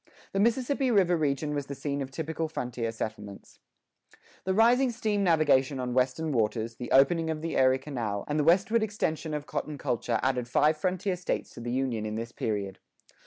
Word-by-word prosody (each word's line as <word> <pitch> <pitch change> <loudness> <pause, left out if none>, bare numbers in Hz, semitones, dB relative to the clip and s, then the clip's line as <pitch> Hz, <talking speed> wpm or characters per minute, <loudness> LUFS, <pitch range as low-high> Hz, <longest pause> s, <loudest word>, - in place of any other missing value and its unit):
The 195 - -1
Mississippi 255 +5 +1
River 190 -6 +4
region 150 -1 -1
was 145 -2 -3
the 140 - -5
scene 140 +1 -3
of 135 - -4
typical 160 +3 -3
frontier 125 -6 -3
settlements.[7:1] 105 -3 -10 0.3
The 190 - +1
rising 245 +4 +5
steam 215 -4 -1
navigation[7:2] 145 -6 +3
on 125 -1 -2
western 130 +5 +1
waters, 115 -1 -1
the 120 - -6
opening 160 +5 +4
of 155 -1 -3
the 165 - -2
Erie 130 0 +4
Canal, 120 -8 -4
and 150 +1 0
the - - +3
westward 195 +8 +3
extension 160 -7 -2
of 150 -1 -4
cotton[7:3] 150 -1 -4
culture 120 -4 -1
added 125 -2 0
five 150 +5 +3
frontier 185 +4 -1
states 180 0 -3
to - - -11
the 120 0 -4
Union 125 -4 -1
in 105 - -4
this 115 +1 -4
period. 100 -5 -3
145 Hz, 185 wpm, -28 LUFS, 125-175 Hz, 0.3 s, rising